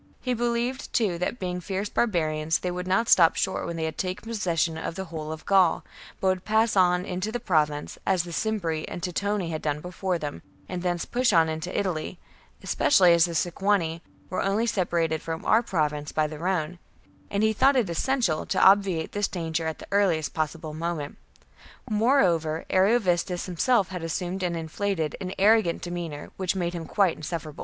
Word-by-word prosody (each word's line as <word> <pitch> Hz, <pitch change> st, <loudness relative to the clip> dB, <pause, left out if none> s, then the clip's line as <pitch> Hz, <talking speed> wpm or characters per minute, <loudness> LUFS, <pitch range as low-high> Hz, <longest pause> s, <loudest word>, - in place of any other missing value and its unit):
He 250 Hz, -, -1 dB
believed, 240 Hz, +2 st, -2 dB
too, 195 Hz, -7 st, +1 dB
that, 180 Hz, +7 st, -2 dB
being 180 Hz, -3 st, -3 dB
fierce 195 Hz, +3 st, -3 dB
barbarians, 160 Hz, -9 st, 0 dB
they 180 Hz, -, -3 dB
would 180 Hz, +1 st, -4 dB
not 195 Hz, +5 st, +2 dB
stop 165 Hz, -6 st, +6 dB
short 190 Hz, -, -1 dB
when 170 Hz, -, -4 dB
they 165 Hz, -, -3 dB
had 160 Hz, 0 st, -4 dB
taken 185 Hz, +4 st, -3 dB
possession 175 Hz, -7 st, 0 dB
of 160 Hz, +1 st, -5 dB
the 190 Hz, -, -4 dB
whole 155 Hz, -1 st, -4 dB
of 160 Hz, 0 st, -8 dB
Gaul, 190 Hz, -4 st, +3 dB, 0.4 s
but 190 Hz, -, +2 dB
would 185 Hz, -1 st, -1 dB
pass 220 Hz, +1 st, +2 dB
into 180 Hz, +2 st, +1 dB
the 245 Hz, -, -2 dB
Province, 150 Hz, -9 st, 0 dB
as 185 Hz, -3 st, +1 dB
the 175 Hz, -, -8 dB
Cimbri 170 Hz, -5 st, -1 dB
and 175 Hz, -, -7 dB
Teutoni 190 Hz, 0 st, -1 dB
had 155 Hz, -, -3 dB
done 150 Hz, -1 st, -1 dB
before 180 Hz, +2 st, -2 dB
them, 150 Hz, -3 st, -6 dB, 0.3 s
and 180 Hz, -1 st, -4 dB
thence 175 Hz, -1 st, -1 dB
push 250 Hz, -1 st, +1 dB
on 165 Hz, -3 st, +4 dB
into 160 Hz, +3 st, -4 dB
Italy, 180 Hz, -2 st, -3 dB, 0.5 s
especially 180 Hz, -10 st, +4 dB
as 170 Hz, 0 st, +5 dB
the 170 Hz, -1 st, -5 dB
Sequani 175 Hz, -1 st, 0 dB, 0.3 s
were 185 Hz, -, -1 dB
only 200 Hz, +4 st, +1 dB
separated 170 Hz, -7 st, 0 dB
from 160 Hz, 0 st, -5 dB
our 225 Hz, -, +4 dB
Province 150 Hz, -8 st, -1 dB
by 155 Hz, -, +1 dB
the 150 Hz, 0 st, -6 dB
Rhone; 175 Hz, -1 st, -1 dB, 0.5 s
and 200 Hz, +1 st, 0 dB
he 220 Hz, 0 st, +3 dB
thought 270 Hz, +6 st, +4 dB
it 245 Hz, -6 st, +2 dB
essential 175 Hz, -, 0 dB
to -, -, 0 dB
obviate 190 Hz, -4 st, +4 dB
this 205 Hz, 0 st, 0 dB
danger 165 Hz, -2 st, -3 dB
at 160 Hz, -, -3 dB
the -, -, -11 dB
earliest 185 Hz, -7 st, +2 dB
possible 155 Hz, 0 st, -3 dB
moment. 160 Hz, -2 st, -4 dB, 0.7 s
Moreover, 190 Hz, -, +2 dB
Ariovistus 185 Hz, -3 st, +2 dB
himself 195 Hz, +3 st, +1 dB
had 180 Hz, -2 st, -5 dB
assumed 180 Hz, +3 st, -3 dB
an 175 Hz, -2 st, -1 dB
inflated 165 Hz, 0 st, -2 dB
and 185 Hz, 0 st, -4 dB
arrogant 205 Hz, -3 st, +3 dB
demeanour, 175 Hz, -4 st, -5 dB
which 190 Hz, 0 st, -1 dB
made 175 Hz, -2 st, -1 dB
him 165 Hz, -2 st, -5 dB
quite 190 Hz, -5 st, +2 dB
insufferable. 155 Hz, -1 st, -6 dB
180 Hz, 185 wpm, -26 LUFS, 160-200 Hz, 0.7 s, stop